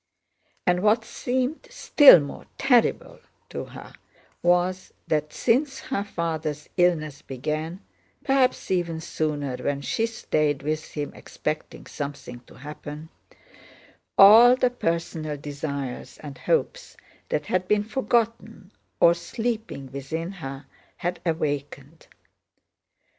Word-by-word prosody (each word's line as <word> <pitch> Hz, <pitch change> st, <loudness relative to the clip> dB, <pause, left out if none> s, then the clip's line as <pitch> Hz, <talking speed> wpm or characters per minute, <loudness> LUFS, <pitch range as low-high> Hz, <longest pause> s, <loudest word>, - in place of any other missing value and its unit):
And 180 Hz, -1 st, +3 dB
what 215 Hz, +2 st, +3 dB
seemed 255 Hz, +5 st, -2 dB
still 285 Hz, -, +8 dB
more 140 Hz, -1 st, -7 dB
terrible 250 Hz, -4 st, +2 dB, 0.3 s
to -, -, -5 dB
her -, -, -12 dB, 0.5 s
was 180 Hz, +1 st, +1 dB, 0.2 s
that 150 Hz, -1 st, 0 dB
since 270 Hz, +4 st, +1 dB
her 230 Hz, -7 st, -3 dB
father's 160 Hz, -5 st, -3 dB
illness 155 Hz, -5 st, +1 dB
began 155 Hz, +7 st, -4 dB, 0.4 s
(perhaps 270 Hz, -6 st, +1 dB
even 170 Hz, -3 st, 0 dB
sooner, 150 Hz, -5 st, -3 dB
when 140 Hz, +1 st, -2 dB
she 225 Hz, -, 0 dB
stayed 155 Hz, -10 st, -1 dB
with 155 Hz, +1 st, -3 dB
him 145 Hz, -2 st, -4 dB
expecting 155 Hz, 0 st, -5 dB
something 140 Hz, -4 st, -7 dB
to -, -, -16 dB
happen), 150 Hz, +3 st, -9 dB, 1.1 s
all 225 Hz, +5 st, +9 dB
the 255 Hz, -1 st, +1 dB
personal 165 Hz, -7 st, -2 dB
desires 140 Hz, -2 st, -5 dB
and 145 Hz, -2 st, -7 dB
hopes -, -, -1 dB, 0.3 s
that 150 Hz, -, -1 dB
had 185 Hz, +3 st, -1 dB
been 210 Hz, +1 st, +2 dB
forgotten 225 Hz, -3 st, -1 dB, 0.3 s
or 170 Hz, -, +7 dB
sleeping 220 Hz, -, -4 dB
within 160 Hz, +6 st, -4 dB
her 135 Hz, -7 st, -8 dB, 0.3 s
had 175 Hz, +1 st, -3 dB
awakened. 145 Hz, -1 st, -3 dB
165 Hz, 110 wpm, -25 LUFS, 145-210 Hz, 1.1 s, all